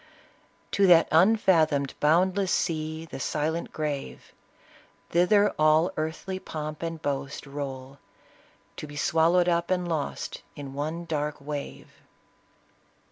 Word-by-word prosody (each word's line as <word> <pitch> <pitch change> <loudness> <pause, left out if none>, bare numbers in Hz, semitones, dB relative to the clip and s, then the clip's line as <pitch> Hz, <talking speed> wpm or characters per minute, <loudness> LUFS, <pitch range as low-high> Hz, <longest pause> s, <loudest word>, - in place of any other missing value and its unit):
To 200 -1 +3
that 170 -2 +7
unfathomed, 160 -6 +3
boundless 185 +5 +2
sea, 160 0 -1
The 160 - -8
silent 155 +5 -2
grave 150 -3 -5 0.8
1 - - -24
Thither 205 +4 +4
all 155 +3 +4
earthly 160 +5 -4
pomp 155 -3 -6
and 165 -1 -4
boast 140 0 -4
Roll, 135 -1 -7 0.8
to 150 - -6
be 145 - -11
swallowed 165 +4 +3
up 170 -1 +1
and 180 -1 0
lost 155 -4 -3
In 140 -2 -8
one 155 +4 -4
dark 150 -2 -2
wave." 145 0 -7
160 Hz, 120 wpm, -27 LUFS, 145-175 Hz, 0.8 s, that